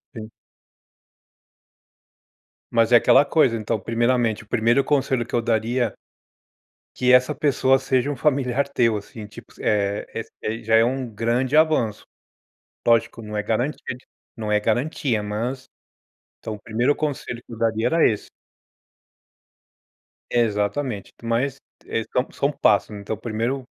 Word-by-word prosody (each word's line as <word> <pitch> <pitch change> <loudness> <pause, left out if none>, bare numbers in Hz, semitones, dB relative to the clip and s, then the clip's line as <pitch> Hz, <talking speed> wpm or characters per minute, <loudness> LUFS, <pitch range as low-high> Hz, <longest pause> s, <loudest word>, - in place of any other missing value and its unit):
Sim. 110 0 -8 2.4
Mas 115 0 +2
é 120 - +9
aquela 135 +4 +5
coisa, 140 -5 +2
então, 110 0 -2
primeiramente, 115 0 0
o - - -23
primeiro 120 +4 +2
conselho 135 -4 +1
que - - -15
eu 120 - +2
daria, 115 0 0 1.0
que 125 0 +2
essa 125 +3 +5
pessoa 135 -1 +2
seja 135 +1 0
um 140 - -3
familiar 135 -1 +1
teu 115 -5 +2
assim, 105 +1 -8
tipo, 105 - -14
é 100 -1 0 0.4
é - - -6
ai 115 +1 -4
já 110 0 +1
é 115 - +6
um 130 +1 -1
grande 120 +5 -1
avanço, 155 -9 +2 0.8
lógico 115 0 +2
não 105 0 -7
é 105 - -1
garantia 120 +3 -2
de 125 - -19 0.3
não 110 -2 -4
é 105 - +3
garantia 120 +1 0
mas, 115 +6 -4 0.7
então, 110 - -5
o 105 - -11
primeiro 120 +6 0
conselho 140 -5 -3
que - - -13
eu 115 - -8
daria 115 0 +1
era 165 +5 +4
esse. 105 - -5 2.0
Exatamente, 110 0 -1
mas 120 +4 0 0.3
é 115 - -2
são 125 - 0
são 140 +1 0
passos, 105 -7 +2
né, 105 -1 -8
então 105 +2 -4
o - - -17
primeiro, 120 +4 -2
120 Hz, 145 wpm, -23 LUFS, 110-130 Hz, 2.4 s, é